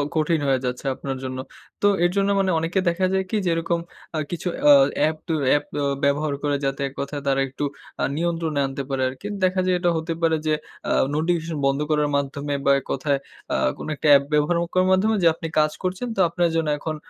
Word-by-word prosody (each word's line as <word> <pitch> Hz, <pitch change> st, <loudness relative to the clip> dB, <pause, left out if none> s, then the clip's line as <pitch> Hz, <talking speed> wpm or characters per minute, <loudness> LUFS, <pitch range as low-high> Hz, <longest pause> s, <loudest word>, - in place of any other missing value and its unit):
কঠিন 155 Hz, 0 st, +2 dB
হয়ে 135 Hz, -1 st, +3 dB
যাচ্ছে 125 Hz, +2 st, -4 dB
আপনার 135 Hz, 0 st, -5 dB
জন্য। 130 Hz, 0 st, -4 dB, 0.4 s
তো 205 Hz, -, +4 dB, 0.2 s
এর 175 Hz, -, +3 dB
জন্য 200 Hz, 0 st, +2 dB
মানে 190 Hz, -1 st, +2 dB
অনেকে 165 Hz, +4 st, 0 dB
দেখা 185 Hz, +2 st, 0 dB
যায় 190 Hz, 0 st, +2 dB
কি 220 Hz, -, 0 dB
যেরকম 170 Hz, 0 st, 0 dB, 0.4 s
আ -, -, 0 dB
কিছু 175 Hz, +1 st, -4 dB, 0.2 s
অ -, -, +10 dB, 0.3 s
অ্যাপ, 155 Hz, +1 st, +2 dB
ত -, -, -20 dB, 0.2 s
অ্যাপ 145 Hz, +2 st, +3 dB, 0.2 s
অ 140 Hz, -, +1 dB, 0.2 s
ব্যবহার 145 Hz, +1 st, +1 dB
করে 145 Hz, -1 st, +1 dB
যাতে 135 Hz, 0 st, -2 dB
এক 135 Hz, -, -10 dB
কথায় 140 Hz, +1 st, -4 dB
তারা 135 Hz, 0 st, +2 dB
একটু 135 Hz, +2 st, -6 dB, 0.4 s
আ -, -, +1 dB
নিয়ন্ত্রণে 165 Hz, -3 st, -1 dB
আনতে 135 Hz, 0 st, -4 dB
পারে 135 Hz, -1 st, -1 dB
আরকি। 135 Hz, +10 st, -8 dB, 0.2 s
দেখা 185 Hz, 0 st, +2 dB
যায় 185 Hz, 0 st, +2 dB
এটা 175 Hz, 0 st, +2 dB
হতে 160 Hz, +1 st, -2 dB
পারে 165 Hz, -1 st, +3 dB
যে 155 Hz, -, +3 dB, 0.4 s
আ -, -, +1 dB, 0.2 s
নোটিফিকেশন 165 Hz, 0 st, -1 dB
বন্ধ 135 Hz, 0 st, +2 dB
করার 150 Hz, -1 st, +2 dB
মাধ্যমে 140 Hz, +1 st, -3 dB
বা 140 Hz, -, +5 dB
এক 135 Hz, -, -16 dB
কথায় 140 Hz, +1 st, 0 dB, 0.4 s
আ -, -, +1 dB, 0.2 s
কোন -, -, -7 dB
একটা 150 Hz, -, -2 dB
অ্যাপ 140 Hz, -1 st, +7 dB
ব্যবহার 150 Hz, +3 st, +3 dB
অ -, -, +1 dB
করার 185 Hz, 0 st, +3 dB
মাধ্যমে 210 Hz, +4 st, +3 dB
যা, -, -, +7 dB
আপনি 165 Hz, -, -5 dB
কাজ 155 Hz, 0 st, +3 dB
করছেন 185 Hz, +6 st, -2 dB
তো -, -, -5 dB
আপনার 170 Hz, +1 st, +1 dB
জন্য 165 Hz, -1 st, +1 dB
এখন 155 Hz, +1 st, -4 dB
155 Hz, 220 wpm, -23 LUFS, 140-175 Hz, 0.4 s, অ